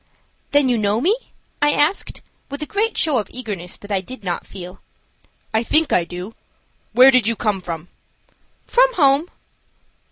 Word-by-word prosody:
"Then 285 -1 +4
you 245 -3 +1
know 210 +1 +1
me?" 365 - +3 0.5
I 295 0 +4
asked, 315 +7 0 0.3
with 285 +2 -5
a - - -3
great 425 +7 -1
show 295 -6 +3
of 210 - -4
eagerness 205 -8 -6
that 205 - -12
I 195 -2 +1
did 255 +5 -10
not 180 -2 -3
feel. 180 -1 -10 0.7
"I 220 - +3
think 310 +6 +2
I 175 - +3
do. 180 +5 -7 0.6
Where 255 +2 +7
did 255 -5 +3
you 230 - +1
come 210 -4 -1
from?" 170 -1 -6 0.8
"From - - +4
home." 285 +2 +3
240 Hz, 165 wpm, -20 LUFS, 195-290 Hz, 0.8 s, Where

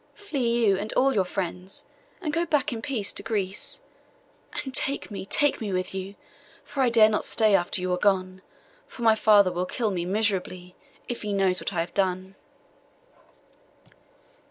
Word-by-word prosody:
Flee, 245 - 0
you 195 -2 +4
and 210 +2 -3
all 270 +1 +3
your 195 -5 +2
friends, 180 0 -5 0.4
and 305 -3 -2
go 335 +1 +1
back 300 -4 0
in 225 - -5
peace 225 -6 -1
to - - -3
Greece; 205 - -3 0.8
and 265 -2 -7
take 275 -2 -1
me, 195 -1 -6
take 290 +3 +2
me 210 -3 -3
with 185 0 -2
you! 190 +1 -6 0.5
for 275 - -4
I 255 - +4
dare 225 -2 +6
not 215 -1 0
stay 215 -2 +3
after 180 -1 +1
you 180 0 -1
are 180 - -1
gone; 185 -2 +1 0.5
for 240 - -9
my 225 -1 +6
father 205 -3 +5
will 180 +1 -2
kill 225 -1 -1
me 175 -2 -2
miserably, 185 -3 -2 0.3
if 240 - -4
he 210 -1 -3
knows 190 -2 +3
what - - -3
I 175 -3 -1
have 170 - -6
done. 190 -1 -1
205 Hz, 180 wpm, -26 LUFS, 185-235 Hz, 0.8 s, dare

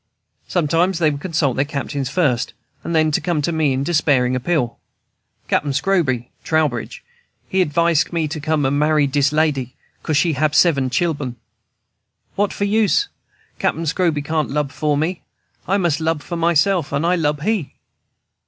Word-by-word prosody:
Sometimes 170 +2 +1
they 160 -3 +2
would 140 0 -6
consult 160 -7 0
their 135 - +3
captains 140 -2 -4
first, 135 -6 0 0.3
and 170 - -3
then 155 -1 +3
come 170 +1 0
to 170 - 0
me 160 -3 +1
in 130 +1 -1
despairing 140 -6 +2
appeal. 130 -2 -1 0.7
"Cap'n 145 -1 0
Scroby 140 -7 0
[Trowbridge] 150 -8 -1 0.4
he 190 - +1
acvise 170 0 +1
me 165 -2 0
not 150 - -7
for 155 0 +1
marry 150 +1 +3
dis 140 0 +1
lady, 150 -5 0 0.3
'cause 155 - 0
she 165 +1 +2
hab 150 +1 +1
seben 145 -5 +3
chil'en. 140 -3 -1 1.0
What 205 0 0
for 200 - -2
use? 220 - +2 0.5
Cap'n 165 - 0
Scroby 160 -2 0
can't 155 -2 -1
lub 145 -1 -1
for 150 -1 0
me. 165 +4 -1 0.5
I 195 - +2
mus' 170 -6 +1
lub 160 -2 -1
for 175 - -5
myself, 170 +1 +2
and 140 +4 0
I 175 - +3
lub 150 -4 0
he." 205 -7 -1
155 Hz, 160 wpm, -20 LUFS, 140-170 Hz, 1.0 s, their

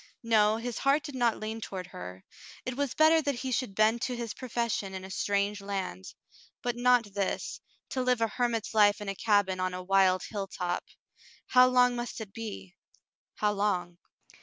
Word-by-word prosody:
No, 220 -1 +4
his 235 0 -4
heart 280 +2 +3
did 290 -3 -7
not 240 -3 +1
lean 220 +1 -5
toward 190 -3 -5
her; 90 - -9 0.4
it 255 - -3
was 280 -1 -2
better 320 +1 +5
that 285 -2 -1
he 260 +2 -4
should 245 -5 -1
bend 220 +3 +3
to 255 -1 -1
his 235 -2 -4
profession 235 -6 -2
in 190 0 -6
a 190 - -9
strange 200 +1 0
land. 190 - -4 0.5
But 245 -1 -1
not 245 -4 +3
this, 195 -1 -2 0.3
to 260 - -2
live 250 -1 +2
a 225 - +2
hermit's 230 0 -1
life 205 -1 +5
in 205 -1 -5
a - - -1
cabin 200 -2 +2
on 185 0 -1
a 185 - -5
wild 190 -1 +3
hilltop. 190 -4 -3 0.7
How 255 0 +7
long 250 -1 +4
must 240 0 -4
it 210 -3 -8
be 95 - -7 0.3
— - - -68
how 210 -1 +3
long 180 -4 -1
215 Hz, 185 wpm, -29 LUFS, 195-245 Hz, 0.7 s, How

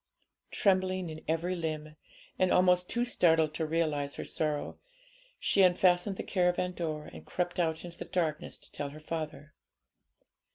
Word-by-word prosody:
Trembling 185 -3 +1
in 155 - -9
every 165 +3 0
limb, 155 -2 -4 0.4
and 185 -1 +3
almost 180 0 +4
too 240 0 +1
startled 160 -9 +3
to 160 0 -2
realise 155 -3 0
her - - -5
sorrow, 150 -2 -2 0.6
she 200 - +3
unfastened 180 +1 +4
the - - -3
caravan 180 -1 +1
door, 155 -4 -4
and 80 - -10
crept 175 - -2
out 160 -1 0
into 170 -1 -10
the - - -5
darkness 160 -5 -1
to - - -14
tell 145 -1 -4
her 150 +2 -10
father. 155 -2 -5
165 Hz, 155 wpm, -31 LUFS, 155-180 Hz, 0.6 s, almost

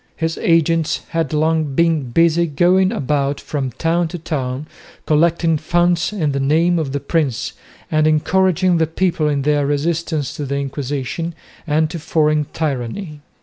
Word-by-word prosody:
His 165 0 -2
agents 165 -1 +2
had 165 -3 -1
long 155 -2 0
been 160 -5 +2
busy 170 +4 +3
going 180 +5 +3
about 140 - -1
from 140 -3 -3
town 170 +4 0
to 170 - -6
town 140 -4 -3 0.4
collecting 165 +1 +2
funds 175 +3 +1
in 165 -9 -1
the 140 - -1
name 165 +5 +2
of 145 -4 -2
the 140 - -2
prince 140 -4 -1 0.4
and 155 0 +3
encouraging 185 +3 +2
the 160 - +2
people 165 -1 0
in 140 -2 0
their 145 -1 +1
resistance 155 -1 -1
to 145 - -3
the 140 +1 -2
Inquisition 140 +4 -3 0.3
and 155 +1 +2
to 170 - -5
foreign 155 -1 +1
tyranny. 150 - -4
155 Hz, 150 wpm, -19 LUFS, 145-170 Hz, 0.4 s, busy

